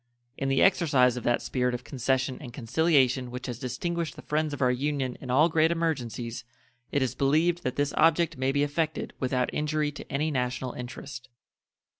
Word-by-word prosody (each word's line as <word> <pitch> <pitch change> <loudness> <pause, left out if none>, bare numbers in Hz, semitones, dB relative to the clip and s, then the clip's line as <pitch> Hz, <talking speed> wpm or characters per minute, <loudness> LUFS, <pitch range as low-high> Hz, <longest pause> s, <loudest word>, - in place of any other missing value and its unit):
In 135 - -2
the 135 - +3
exercise 140 -10 +4
of 125 - -5
that 120 - +1
spirit 125 -1 0
of 125 - -7
concession 130 0 -1
and 125 -5 -8
conciliation 130 0 +2
which 125 +1 -6
has 120 -3 -5
distinguished 165 +6 -3
the - - -11
friends 155 0 0
of 145 - -5
our 125 -2 +3
Union 135 -1 -1
in 130 - -8
all 145 +6 +5
great 160 -1 +3
emergencies, 125 -8 -2 0.5
it 145 - +2
is 130 - -1
believed 160 +5 +2
that 130 - -2
this 145 0 0
object 165 +1 +3
may 130 +1 0
be 145 +1 +2
effected 155 +2 -2
without 125 -1 0
injury 150 0 0
to 150 - -10
any 150 +3 0
national 125 -1 -2
interest. 130 +1 -8
135 Hz, 185 wpm, -27 LUFS, 125-155 Hz, 0.5 s, all